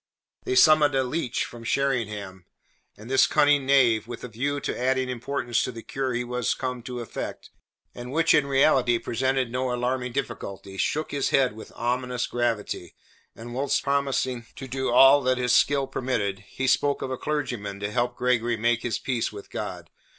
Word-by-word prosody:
They 130 Hz, -, -1 dB
summoned 150 Hz, +1 st, +6 dB
a 135 Hz, -, +3 dB
leech 130 Hz, -1 st, -2 dB
from 120 Hz, -1 st, -11 dB
Sheringham, 105 Hz, -8 st, -2 dB, 0.5 s
and 110 Hz, -, -12 dB
this 130 Hz, +1 st, +4 dB
cunning 145 Hz, -2 st, +3 dB
knave, 120 Hz, -5 st, +4 dB
with 120 Hz, -1 st, -8 dB
a -, -, -4 dB
view 140 Hz, +6 st, -2 dB
to -, -, -3 dB
adding 130 Hz, +1 st, 0 dB
importance 120 Hz, -1 st, -1 dB
to -, -, -2 dB
the 115 Hz, -2 st, -9 dB
cure 135 Hz, -1 st, -3 dB
he 120 Hz, -, -1 dB
was 125 Hz, -1 st, -1 dB
come 125 Hz, -2 st, -4 dB
to 125 Hz, 0 st, -6 dB
effect, 115 Hz, -, -7 dB, 0.4 s
and 120 Hz, +1 st, -8 dB
which 165 Hz, +3 st, +3 dB
in 150 Hz, -3 st, +3 dB
reality 135 Hz, -3 st, +3 dB
presented 130 Hz, +2 st, -1 dB
no 125 Hz, 0 st, -1 dB
alarming 125 Hz, +1 st, -1 dB
difficulty, 100 Hz, -7 st, -5 dB
shook 155 Hz, +10 st, -1 dB
his 140 Hz, -2 st, 0 dB
head 130 Hz, -4 st, +3 dB
with 110 Hz, -, -11 dB
ominous 125 Hz, +1 st, -1 dB
gravity, 115 Hz, -7 st, -2 dB, 0.4 s
and 120 Hz, +1 st, -9 dB
whilst 140 Hz, +2 st, 0 dB
promising 135 Hz, -4 st, -1 dB
to 135 Hz, -, -8 dB
do 130 Hz, +1 st, -2 dB
"all 135 Hz, +3 st, +7 dB
that 130 Hz, -1 st, +1 dB
his 125 Hz, -1 st, +1 dB
skill 140 Hz, -1 st, +3 dB
permitted," 110 Hz, -7 st, -2 dB
he 135 Hz, -, -3 dB
spoke 140 Hz, +2 st, +2 dB
of 130 Hz, -, -4 dB
a -, -, -1 dB
clergyman 125 Hz, -10 st, -3 dB
to 100 Hz, +1 st, -3 dB
help 120 Hz, +1 st, 0 dB
Gregory 120 Hz, -2 st, +1 dB
make 120 Hz, +1 st, +1 dB
his 120 Hz, -, -1 dB
peace 125 Hz, -3 st, -2 dB
with 100 Hz, -1 st, -11 dB
God. -, -, -6 dB
125 Hz, 180 wpm, -25 LUFS, 120-135 Hz, 0.5 s, all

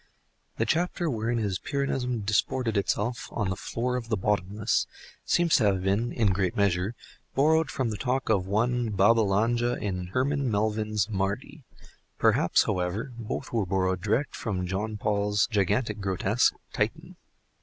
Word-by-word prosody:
The -, -, +1 dB
chapter 170 Hz, -1 st, 0 dB
wherein 115 Hz, +1 st, -1 dB
his 100 Hz, -5 st, -1 dB
Pyrrhonism 130 Hz, -4 st, -2 dB
disported 115 Hz, +2 st, +1 dB
itself 105 Hz, +4 st, -1 dB
"on 105 Hz, -4 st, -1 dB
the -, -, -1 dB
floor 125 Hz, +5 st, -2 dB
of 115 Hz, -2 st, -6 dB
the 110 Hz, -, +1 dB
bottomless" 105 Hz, +2 st, 0 dB, 0.4 s
seems 170 Hz, -2 st, +3 dB
to 120 Hz, -, +2 dB
have 95 Hz, -2 st, +2 dB
been, 100 Hz, +5 st, +1 dB
in 105 Hz, -5 st, +2 dB
great 95 Hz, -1 st, -1 dB
measure, 100 Hz, +2 st, +1 dB, 0.4 s
borrowed 155 Hz, +2 st, +3 dB
from 130 Hz, -4 st, -1 dB
the 105 Hz, -, -4 dB
talk 130 Hz, +3 st, -1 dB
of 95 Hz, -4 st, +1 dB
one 120 Hz, +3 st, +1 dB
Babbalanja 110 Hz, +3 st, +3 dB
in 90 Hz, -3 st, -3 dB
Herman 135 Hz, +6 st, 0 dB
Melville's 105 Hz, -1 st, 0 dB
"Mardi;" 110 Hz, +8 st, -3 dB, 0.5 s
perhaps, -, -, +3 dB
however, 95 Hz, +7 st, -2 dB
both 120 Hz, +3 st, -5 dB
were 115 Hz, -3 st, +2 dB
borrowed 95 Hz, -1 st, 0 dB
direct 110 Hz, +8 st, 0 dB
from 95 Hz, -5 st, -3 dB
Jean 105 Hz, +4 st, -3 dB
Paul's 105 Hz, -1 st, +1 dB
gigantic 105 Hz, +2 st, +1 dB
grotesque, 95 Hz, +4 st, +1 dB, 0.2 s
"Titan." -, -, -2 dB
110 Hz, 145 wpm, -27 LUFS, 100-120 Hz, 0.5 s, seems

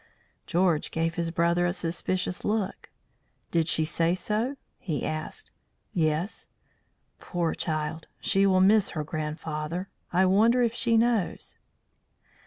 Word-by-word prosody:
George 170 Hz, -3 st, +2 dB
gave 165 Hz, +1 st, -1 dB
his 170 Hz, 0 st, -1 dB
brother 170 Hz, +1 st, +2 dB
a -, -, +1 dB
suspicious 180 Hz, +1 st, -1 dB
look. 210 Hz, -2 st, -2 dB, 0.6 s
"Did 165 Hz, -2 st, +2 dB
she 160 Hz, -, +2 dB
say 165 Hz, +2 st, +1 dB
so?" 220 Hz, +8 st, -1 dB, 0.2 s
he 155 Hz, -6 st, -3 dB
asked. 155 Hz, -, -4 dB, 0.4 s
"Yes." 160 Hz, +3 st, 0 dB, 0.7 s
"Poor 175 Hz, -3 st, -1 dB
child! 155 Hz, 0 st, -3 dB
She 195 Hz, +1 st, +3 dB
will 185 Hz, -1 st, +4 dB
miss 205 Hz, +2 st, +5 dB
her 155 Hz, -, 0 dB
grandfather. 155 Hz, +3 st, -4 dB, 0.2 s
I 185 Hz, +2 st, +4 dB
wonder 225 Hz, +6 st, +4 dB
if 230 Hz, -1 st, +1 dB
she 235 Hz, -1 st, +2 dB
knows?" 225 Hz, -5 st, 0 dB
175 Hz, 125 wpm, -27 LUFS, 160-200 Hz, 0.7 s, miss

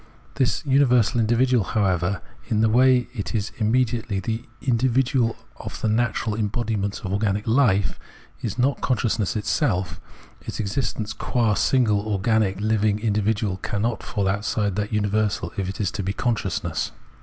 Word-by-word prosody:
This 130 Hz, +2 st, 0 dB
universal 125 Hz, -4 st, +3 dB
individual, 120 Hz, +1 st, +3 dB
however, 95 Hz, -3 st, 0 dB, 0.2 s
in 110 Hz, -1 st, +1 dB
the 110 Hz, -, +4 dB
way 125 Hz, +1 st, +4 dB
it 105 Hz, -2 st, -4 dB
is 105 Hz, -1 st, -1 dB
immedi 120 Hz, +1 st, +2 dB
ately 100 Hz, -3 st, -2 dB
the 115 Hz, 0 st, -2 dB, 0.2 s
individual 125 Hz, -1 st, +1 dB, 0.2 s
of -, -, -7 dB
the -, -, -1 dB
natural 110 Hz, 0 st, 0 dB
embodiments 105 Hz, -1 st, -2 dB
of 95 Hz, -1 st, -4 dB
organic 100 Hz, 0 st, 0 dB
hfe, 110 Hz, -5 st, +2 dB, 0.4 s
is 110 Hz, -1 st, -3 dB
not 130 Hz, +3 st, +1 dB
consciousness 115 Hz, -4 st, 0 dB
itself; 105 Hz, -, -1 dB, 0.4 s
its -, -, -6 dB
existence 110 Hz, 0 st, -2 dB
qua 115 Hz, -4 st, 0 dB
single 110 Hz, -2 st, +2 dB
organic 105 Hz, -1 st, +1 dB
living 110 Hz, -1 st, +1 dB
individual 105 Hz, -2 st, 0 dB
cannot 105 Hz, +3 st, -2 dB
fall 100 Hz, -2 st, -2 dB
outside 100 Hz, 0 st, 0 dB
that 105 Hz, +1 st, -2 dB
universal 105 Hz, 0 st, 0 dB
if 95 Hz, -3 st, -2 dB
it 95 Hz, -, -6 dB
is 100 Hz, -3 st, 0 dB
to 105 Hz, -, -3 dB
be 95 Hz, +1 st, -2 dB
consciousness. 110 Hz, -7 st, -1 dB
110 Hz, 145 wpm, -23 LUFS, 100-120 Hz, 0.4 s, the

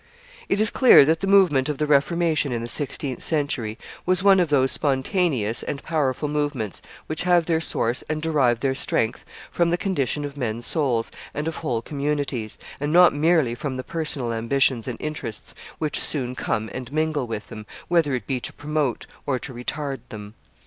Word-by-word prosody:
] -, -, -21 dB
It 200 Hz, -, +1 dB
is 215 Hz, 0 st, +4 dB
clear 255 Hz, -, +7 dB
that 160 Hz, +2 st, +2 dB
the 195 Hz, -, -2 dB
movement 175 Hz, -9 st, +4 dB
of 150 Hz, -, -2 dB
the 150 Hz, -, 0 dB
Reformation 155 Hz, 0 st, +2 dB
in 115 Hz, -1 st, -2 dB
the -, -, -4 dB
sixteenth 140 Hz, 0 st, -2 dB
century 140 Hz, -8 st, -1 dB, 0.3 s
was 185 Hz, +1 st, +1 dB
one 195 Hz, -1 st, +6 dB
of 175 Hz, -3 st, +2 dB
those 135 Hz, -3 st, +3 dB
spontaneous 135 Hz, -, +1 dB
and 140 Hz, -, -5 dB
powerful 150 Hz, -3 st, -1 dB
movements 145 Hz, -, -2 dB, 0.2 s
which 155 Hz, -, -2 dB
have 175 Hz, -2 st, +3 dB
their 165 Hz, -1 st, +1 dB
source 120 Hz, -6 st, 0 dB
and 155 Hz, 0 st, -1 dB
derive 140 Hz, -7 st, +1 dB
their 135 Hz, -1 st, +1 dB
strength 115 Hz, -2 st, -1 dB, 0.3 s
from 170 Hz, -1 st, +1 dB
the 175 Hz, -, +1 dB
condition 150 Hz, -, -1 dB
of 140 Hz, -1 st, -7 dB
men's 120 Hz, -3 st, -3 dB
souls 125 Hz, -8 st, +1 dB, 0.2 s
and 150 Hz, +2 st, -2 dB
of 165 Hz, -, -3 dB
whole 120 Hz, -8 st, -2 dB
communities, 140 Hz, -6 st, -2 dB, 0.2 s
and 145 Hz, +1 st, -2 dB
not 175 Hz, +1 st, +7 dB
merely 155 Hz, -4 st, +2 dB
from 130 Hz, +2 st, -4 dB
the 130 Hz, -, -4 dB
personal 145 Hz, -8 st, -2 dB
ambitions 120 Hz, +1 st, +1 dB
and 120 Hz, -3 st, -5 dB
interests 150 Hz, -8 st, -6 dB, 0.2 s
which 150 Hz, -2 st, 0 dB
soon 125 Hz, -4 st, +1 dB
come 110 Hz, -3 st, -2 dB
and 130 Hz, 0 st, -6 dB
mingle 155 Hz, -3 st, 0 dB
with 110 Hz, -2 st, -6 dB
them, 105 Hz, -1 st, -9 dB, 0.2 s
whether 165 Hz, -6 st, +2 dB
it 120 Hz, -5 st, -5 dB
be 130 Hz, +3 st, -2 dB
to -, -, -5 dB
promote 150 Hz, -4 st, -2 dB, 0.2 s
or 135 Hz, -2 st, +1 dB
to 130 Hz, +1 st, -7 dB
retard 135 Hz, +3 st, -4 dB
them. 105 Hz, -1 st, -9 dB
145 Hz, 190 wpm, -23 LUFS, 125-160 Hz, 0.3 s, clear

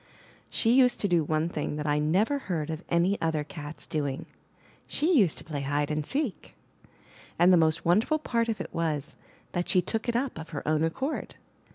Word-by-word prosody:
She 225 Hz, -, +2 dB
used 250 Hz, 0 st, +4 dB
to 205 Hz, -, +2 dB
do 175 Hz, -3 st, +3 dB
one 155 Hz, +2 st, 0 dB
thing 150 Hz, -3 st, -3 dB
that 150 Hz, 0 st, -4 dB
I 150 Hz, 0 st, +2 dB
never 195 Hz, -, +2 dB
heard 165 Hz, -, -3 dB
of 160 Hz, +3 st, -5 dB
any 175 Hz, +4 st, +2 dB
other 160 Hz, -2 st, 0 dB
cat's 150 Hz, 0 st, -7 dB
doing: 145 Hz, -3 st, -2 dB, 0.6 s
she 330 Hz, +4 st, +2 dB
used 195 Hz, -, +4 dB
to -, -, -7 dB
play 150 Hz, -3 st, -4 dB
hide 145 Hz, +2 st, -1 dB
and 150 Hz, 0 st, -1 dB
seek. 270 Hz, -, -3 dB, 0.8 s
And 175 Hz, +2 st, +6 dB
the -, -, +7 dB
most 160 Hz, -1 st, +2 dB
wonderful 215 Hz, -, +3 dB
part 235 Hz, -6 st, -1 dB
of 220 Hz, -, -2 dB
it -, -, -6 dB
was, 155 Hz, -3 st, -2 dB, 0.4 s
that 175 Hz, 0 st, -2 dB
she 185 Hz, -, +4 dB
took 220 Hz, +6 st, -2 dB
it 235 Hz, -, 0 dB
up 250 Hz, -7 st, -1 dB
of 160 Hz, -, -8 dB
her 145 Hz, -3 st, -6 dB
own 155 Hz, 0 st, +2 dB
accord. 265 Hz, -, -2 dB
165 Hz, 200 wpm, -28 LUFS, 150-225 Hz, 0.8 s, the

